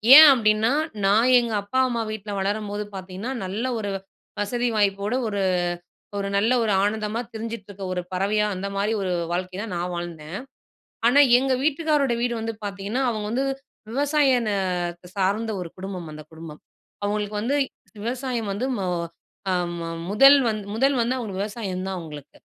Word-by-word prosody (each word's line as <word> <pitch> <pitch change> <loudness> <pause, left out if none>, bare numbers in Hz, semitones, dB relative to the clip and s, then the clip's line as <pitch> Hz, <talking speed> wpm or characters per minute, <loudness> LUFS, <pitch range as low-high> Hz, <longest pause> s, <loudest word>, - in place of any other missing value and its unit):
ஏன் 310 0 +12
அப்படின்னா 220 0 +3 0.3
நான் 220 +6 +4
எங்க 235 -2 -2
அப்பா 230 +6 -1
அம்மா 235 -2 -1
வீட்ல 210 -1 -6
வளரம்போது 205 +1 -2
பார்த்தீங்கன்னா, 190 +6 -5
நல்ல 210 +7 -3
ஒரு 205 -2 -3
வ் 190 - -5 0.4
வசதி 240 +4 0
வாய்ப்போடு 200 +3 +1
ஒரு 200 -2 -1 0.8
ஒரு 200 0 -1
நல்ல 220 +5 +2
ஒரு 215 - +1
ஆனந்தமா 215 +2 -1
திரிஞ்சிட்டு 225 -2 -5
இருக்க 195 -1 -8
ஒரு 180 - -1
பறவையா, 205 +3 +1
அந்த 195 +2 -3
மாதிரி 205 +2 0
ஒரு 185 -1 -1 0.2
வாழ்க்கைதான் 185 +4 -3
நான் 175 +1 -2
வாழ்ந்தேன். 170 -1 -6 0.7
ஆனா 275 +4 +5 0.2
எங்க 265 0 +1
வீட்டுக்காரோடைய 295 -5 +2
வீடு 240 -1 +1
வந்து 225 0 -3
பார்த்தீங்கன்னா 200 +5 -3
அவங்க 215 -2 -3
வந்து 260 +3 +1 0.5
விவசாய 280 -1 +3
இந்த 215 -2 -1 0.6
சார்ந்த 205 +4 0
ஒரு 170 - -6
குடும்பம் 185 -3 -6
அந்த 155 0 -9
குடும்பம். 160 -1 -10 0.4
அவங்களுக்கு 210 0 -1
வந்து 275 +6 +1 0.5
விவசாயம் 245 -2 -2
வந்து 245 +6 -2
மொ 190 - -1 0.7
அம் 175 -1 -1
ம 165 - -4 0.2
முதல் 275 +7 +8
வந் 215 -1 0 0.2
முதல் 270 +3 +3
வந்து 245 +3 +1
அவங்களுக்கு 200 -6 -4
விவசாயம் 200 -4 -4
தான் 190 -1 -3
அவங்களுக்கு. 150 -4 -10
210 Hz, 155 wpm, -24 LUFS, 195-240 Hz, 0.8 s, ஏன்